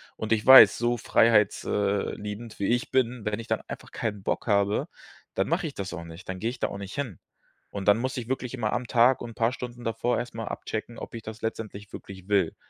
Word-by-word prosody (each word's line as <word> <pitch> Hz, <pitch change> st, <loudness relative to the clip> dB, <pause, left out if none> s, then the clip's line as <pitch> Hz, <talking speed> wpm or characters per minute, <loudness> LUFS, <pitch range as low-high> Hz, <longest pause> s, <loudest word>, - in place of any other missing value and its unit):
und 110 Hz, -, -5 dB
ich 110 Hz, -1 st, 0 dB
weiß, 130 Hz, 0 st, +10 dB
so 120 Hz, 0 st, +1 dB
freiheits 110 Hz, -2 st, +3 dB
äh, 100 Hz, -1 st, 0 dB
liebend 105 Hz, +2 st, -7 dB
wie 100 Hz, -, 0 dB
ich 120 Hz, +1 st, 0 dB
bin, 125 Hz, -3 st, 0 dB
wenn 105 Hz, +1 st, -1 dB
ich 115 Hz, -, -7 dB
dann -, -, 0 dB
einfach -, -, -8 dB
keinen 105 Hz, -4 st, -4 dB
Bock -, -, -2 dB
habe, 100 Hz, -1 st, +2 dB, 0.5 s
dann 95 Hz, -, +1 dB
mache 170 Hz, +2 st, 0 dB
ich 145 Hz, -, -8 dB
das 95 Hz, -1 st, -5 dB
auch 85 Hz, -, -6 dB
nicht. 85 Hz, +2 st, -11 dB
Dann 95 Hz, 0 st, -4 dB
gehe 115 Hz, -, -1 dB
ich 125 Hz, 0 st, -7 dB
da -, -, +1 dB
auch -, -, -6 dB
nicht 100 Hz, 0 st, -7 dB
hin. 125 Hz, -, -4 dB, 0.5 s
Und 100 Hz, -2 st, -6 dB
dann 105 Hz, -, +6 dB
muss 130 Hz, +2 st, -2 dB
ich 120 Hz, -3 st, -4 dB
wirklich 130 Hz, -2 st, -3 dB
immer 110 Hz, -4 st, -1 dB
am 120 Hz, 0 st, -2 dB
Tag 120 Hz, +2 st, +4 dB
und 120 Hz, -, -6 dB
'n -, -, -15 dB
paar 115 Hz, 0 st, +2 dB
Stunden 120 Hz, -1 st, -7 dB
davor 115 Hz, +2 st, 0 dB
erst 120 Hz, +1 st, -5 dB
mal 115 Hz, -1 st, -4 dB
abchecken, 115 Hz, +2 st, -5 dB
ob -, -, -8 dB
ich 115 Hz, -, -6 dB
das 110 Hz, 0 st, -8 dB
letztendlich 105 Hz, -2 st, -5 dB
wirklich 95 Hz, -1 st, -10 dB
will. 100 Hz, -5 st, +2 dB
115 Hz, 245 wpm, -27 LUFS, 100-120 Hz, 0.5 s, weiß